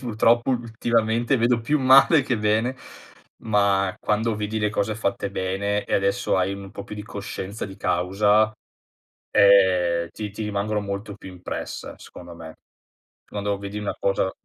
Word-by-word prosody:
Purtroppo, 120 0 +2
ultimamente, 115 0 0
vedo 120 0 +2
più 150 +6 +1
male 135 +4 +6
che 130 -3 -1
bene, 110 +4 +1 0.7
ma 100 -3 +2
quando 110 +1 0
vedi 105 +1 -3
le 105 -1 0
cose 110 0 -1
fatte 100 -1 -2
bene, 100 +2 -2
e - - -2
adesso 100 0 +1
hai 95 +1 0
un 100 -1 -9
po' 100 - -8
più 105 - -8
di 105 - -6
coscienza 100 0 -6
di 95 -1 -11
causa, 105 +4 +2 0.8
ehm, 90 -4 +4
ti 105 -1 -6
ti 110 - -6
rimangono 105 0 -1
molto 100 0 -5
più 95 - -11
impresse, 90 -1 -7
secondo 85 -1 -12
me. 80 -1 -11 0.7
Quando 100 -1 -3
vedi 100 +1 -7
una 105 - -3
cosa 95 -1 0
105 Hz, 155 wpm, -23 LUFS, 100-110 Hz, 0.8 s, male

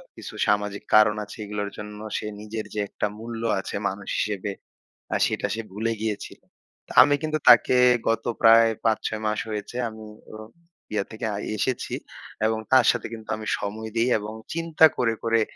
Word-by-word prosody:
কিছু - - -9
সামাজিক 105 0 0
কারণ 105 0 +6
আছে। 105 - -11
এগুলোর 105 0 -3
জন্য 105 0 -8 0.2
সে - - -5 0.2
নিজের 110 +1 -5
যে 105 - -3
একটা - - -2
মূল্য 115 0 -6 0.2
আছে 95 - -6
মানুষ 95 +1 -8
হিসেবে, 105 -1 -2 0.6
আ - - +2
সেটা - - -1
সে 115 - -3
ভুলে 110 +3 -1
গিয়েছিল। 110 -2 -4 0.5
তা - - -9
আমি 145 - +3
কিন্তু 155 0 -1
তাকে 120 +1 +7 0.3
গত 115 0 +1 0.2
প্রায় 115 0 +7 0.2
৫-৬ 110 -1 0
মাস 105 0 0
হয়েছে 105 +3 -5
আমি 110 0 -11 0.3
অ 110 - -8 0.6
ইয়া 105 - +1
থেকে 110 +1 -5
আ - - -3 0.2
এসেছি। 130 +4 -2 0.5
এবং 110 0 +1
তার 130 -3 +6
সাথে - - -4
কিন্তু 110 -1 -10
আমি 110 -1 -7
সময় 110 +2 -5
দেই 115 +1 +2
এবং 105 +1 -7 0.2
চিন্তা 165 -1 +4
করে, 115 -3 +2
করে 115 0 +2
110 Hz, 175 wpm, -25 LUFS, 105-115 Hz, 0.6 s, তাকে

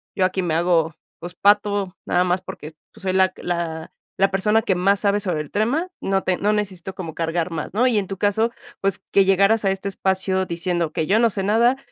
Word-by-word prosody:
Yo 190 - +2
aquí 185 0 -1
me 170 -3 -1
hago, 165 -1 +2 0.3
pues 175 +1 -8
pato, 205 -1 +2
nada 180 +1 +2
más 180 +1 0
porque, 155 -4 -9 0.2
pues, 220 - -14
soy 185 -1 0
la 190 0 +4
que 185 - -15
la 165 -2 -3 0.3
la 195 +1 +4
persona 210 +3 +2
que 190 - 0
más 195 +3 +2
sabe 205 0 +2
sobre 180 -6 -1
el 150 - -9
tema. 265 - 0
No 195 0 0
te 185 -1 0
no 210 +1 +1
necesito 190 -3 -3
como 165 -5 -7
cargar 165 +1 -1
más, 160 +2 -5
¿no? 245 +5 +3
Y 230 -4 +2
en 195 - 0
tu 195 - -6
caso, 215 +4 +1 0.3
pues 195 0 -1
que 195 - +4
llegaras 195 +3 +3
a 195 - +3
este 195 +1 -3
espacio 190 -1 0
diciendo 170 -2 -2
que 155 - -1
yo 205 - +3
no 230 -1 +3
sé 195 - -1
nada, 230 +6 +3
190 Hz, 230 wpm, -22 LUFS, 175-205 Hz, 0.3 s, la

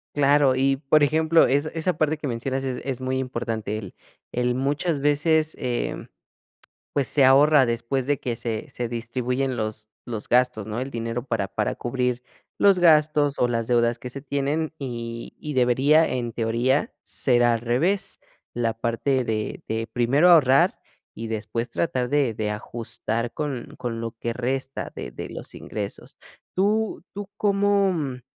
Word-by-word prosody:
Claro 140 -2 +4
y, 135 +1 +2
por 145 +2 +3
ejemplo, 160 +2 +4
es 145 +3 +2
esa 165 0 -1
parte 155 0 +1
que 145 - -4
mencionas 130 +3 -2
es 130 -2 -3
es 130 -2 -3
muy 130 0 -1
importante, 115 -5 -3
el 100 -4 -9 0.3
el 125 0 0
muchas 145 +4 0
veces, 155 +2 +2
em, 125 -3 -3 0.9
pues 140 -2 0
se 140 - +3
ahorra 140 +2 +6
después 120 +2 -1
de 145 -1 +2
que 120 -2 -3
se 115 +4 -4
se 120 -2 -4
distribuyen 125 +3 -2
los 110 0 -4 0.2
los 115 -3 -5
gastos, 125 -4 +2
¿no?, 110 +2 -3
el 135 +2 -4
dinero 115 0 -3
para, 115 -6 -1
para 105 +2 -1
cubrir 125 0 -1 0.4
los 200 -2 +5
gastos 150 -3 +4
o 125 - +3
las 115 -1 -2
deudas 120 -1 +2
que 125 - -6
se 140 +2 -7
tienen, 145 +3 -1
y 115 -3 -5
y 150 - -5
debería, 135 +6 +4
en 120 -2 -2
teoría, 120 - 0
ser 120 -2 +2
al 120 -1 +3
revés 140 - 0 0.3
la 115 -2 -1
parte 115 +4 0
de 110 -2 -3
de 110 0 -2
primero 120 +8 +3
ahorrar 140 -6 +5 0.3
y 115 0 -6
después 115 +2 -3
tratar 125 -5 -1
de 135 -5 +1
de 105 -1 -2
ajustar 115 +2 -4
con 140 -5 -5
con 115 -2 -4
lo 115 0 -3
que 115 - -2
resta 130 +2 -3
de - - -6
de - - -6
los - - -9
ingresos. 105 -2 -7 0.4
¿Tú, 210 +3 +1
tú 200 0 -7
cómo, 200 -1 +2
mm? 135 -7 -3
130 Hz, 165 wpm, -24 LUFS, 115-145 Hz, 0.9 s, ahorra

